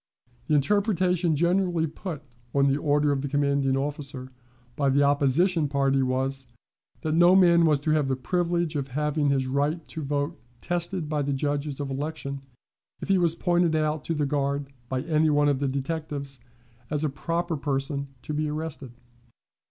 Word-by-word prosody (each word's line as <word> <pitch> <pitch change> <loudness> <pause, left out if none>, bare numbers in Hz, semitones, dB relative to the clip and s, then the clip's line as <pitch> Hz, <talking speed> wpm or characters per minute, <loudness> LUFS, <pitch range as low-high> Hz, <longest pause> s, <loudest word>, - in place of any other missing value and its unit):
The 150 - +3
interpretation 180 0 +2
generally 175 +1 +1
put 160 -1 -6 0.3
on 140 0 +4
the 140 0 +2
order 145 0 +2
of 140 -1 0
the 140 - -3
commanding 140 -1 +1
officer 135 -2 -4 0.4
by 140 -2 +1
the 140 +2 +3
opposition 145 +4 +3
party 135 -1 +1
was, 130 +1 -1 0.5
that 155 -2 -1
no 175 +3 +6
man 170 -3 +6
was 150 -2 +3
to 155 - 0
have 155 -3 +2
the 135 - 0
privilege 170 +2 -1
of 140 -2 -2
having 150 0 +1
his 135 -1 +1
right 145 +5 -1
to 160 - -5
vote 145 +3 -2 0.2
tested 175 0 -1
by 150 -1 -1
the 140 0 -1
judges 145 +1 -2
of 140 -1 -3
election 140 -1 -4 0.6
if - - -7
he 195 -1 +4
was 170 -2 +2
pointed 175 -2 +2
out 155 -1 0
to 165 - -1
the 150 -1 0
guard 140 0 -1 0.2
by 130 -1 -1
any 155 -1 +2
one 145 0 +3
of 140 -2 +2
the 140 - 0
detectives 140 -1 -3 0.5
as 150 0 0
a - - +2
proper 165 +4 -2
person 140 0 -2 0.2
to 150 - -5
be 150 0 -1
arrested. 150 -4 -5
150 Hz, 175 wpm, -26 LUFS, 140-165 Hz, 0.6 s, no